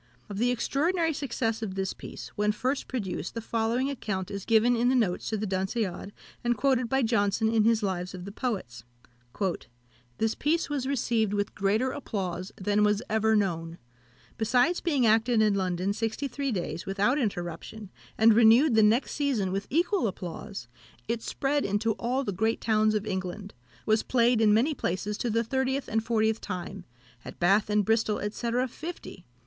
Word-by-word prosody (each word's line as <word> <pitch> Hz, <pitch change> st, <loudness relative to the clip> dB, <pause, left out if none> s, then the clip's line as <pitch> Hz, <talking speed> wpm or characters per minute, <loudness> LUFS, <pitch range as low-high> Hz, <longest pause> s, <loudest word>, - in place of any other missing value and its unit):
Of 200 Hz, -1 st, -5 dB
the 245 Hz, +2 st, +2 dB
extraordinary 320 Hz, +7 st, +1 dB
success 235 Hz, -5 st, -2 dB
of 200 Hz, -4 st, -4 dB
this 190 Hz, -1 st, -2 dB
piece, -, -, -9 dB
when 210 Hz, 0 st, 0 dB
first 260 Hz, +6 st, -2 dB
produced, 200 Hz, -7 st, -4 dB
the -, -, -2 dB
following 230 Hz, +3 st, 0 dB
account 195 Hz, -8 st, -4 dB
is 200 Hz, -1 st, -5 dB
given 230 Hz, +2 st, +4 dB
in 240 Hz, +1 st, +2 dB
the 260 Hz, -, +3 dB
notes 205 Hz, -8 st, 0 dB
to 220 Hz, -, -1 dB
The 210 Hz, -, -2 dB
Dunciad, 190 Hz, 0 st, -2 dB, 0.3 s
and 240 Hz, -1 st, +1 dB
quoted 255 Hz, -2 st, +1 dB
by 265 Hz, +1 st, +2 dB
Johnson 220 Hz, -1 st, +1 dB
in 220 Hz, -2 st, +3 dB
his 225 Hz, -1 st, +3 dB
Lives 185 Hz, -1 st, -2 dB
of 180 Hz, 0 st, -8 dB
the 200 Hz, -, -7 dB
Poets: 185 Hz, -, -4 dB, 1.3 s
"This 225 Hz, 0 st, +1 dB
piece 315 Hz, +1 st, 0 dB
was 270 Hz, -3 st, -1 dB
received 230 Hz, -6 st, 0 dB
with 205 Hz, 0 st, -1 dB
greater 215 Hz, +6 st, +1 dB
applause 185 Hz, -8 st, -4 dB
than 205 Hz, +2 st, +1 dB
was 210 Hz, +2 st, +2 dB
ever 220 Hz, 0 st, +3 dB
known. 170 Hz, -5 st, -1 dB, 0.6 s
Besides 245 Hz, +10 st, +2 dB
being 285 Hz, -8 st, +1 dB
acted 225 Hz, +1 st, +3 dB
in 215 Hz, -1 st, +4 dB
London 185 Hz, 0 st, -1 dB
sixty 225 Hz, +6 st, -2 dB
three 275 Hz, +1 st, -3 dB
days 170 Hz, -4 st, -4 dB
without 205 Hz, +8 st, +1 dB
interruption, 190 Hz, -, -4 dB, 0.3 s
and 225 Hz, 0 st, +6 dB
renewed 235 Hz, +5 st, +6 dB
the 220 Hz, -, +5 dB
next 220 Hz, +5 st, +3 dB
season 255 Hz, -10 st, 0 dB
with 195 Hz, +1 st, -3 dB
equal 345 Hz, -, +1 dB
applause, 190 Hz, -, -6 dB, 0.4 s
it 230 Hz, -1 st, -1 dB
spread 285 Hz, +4 st, -1 dB
into 205 Hz, +3 st, 0 dB
all 255 Hz, +3 st, 0 dB
the 205 Hz, -, -2 dB
great 220 Hz, +5 st, 0 dB
towns 215 Hz, -1 st, +2 dB
of 210 Hz, 0 st, -1 dB
England; 190 Hz, +1 st, -4 dB, 0.3 s
was 215 Hz, 0 st, +3 dB
played 240 Hz, -2 st, +2 dB
in 215 Hz, -1 st, +5 dB
many 240 Hz, +9 st, +3 dB
places 200 Hz, -3 st, -2 dB
to 240 Hz, -, -1 dB
the 230 Hz, +1 st, +1 dB
thirtieth 265 Hz, +3 st, -1 dB
and 220 Hz, 0 st, 0 dB
fortieth 220 Hz, -1 st, +1 dB
time; 185 Hz, 0 st, -6 dB, 0.4 s
at -, -, -9 dB
Bath 200 Hz, +5 st, +3 dB
and 210 Hz, -1 st, +2 dB
Bristol, 220 Hz, -1 st, +1 dB
&c. 235 Hz, +2 st, -3 dB, 0.2 s
fifty. 305 Hz, -, -9 dB
220 Hz, 175 wpm, -28 LUFS, 200-245 Hz, 1.3 s, and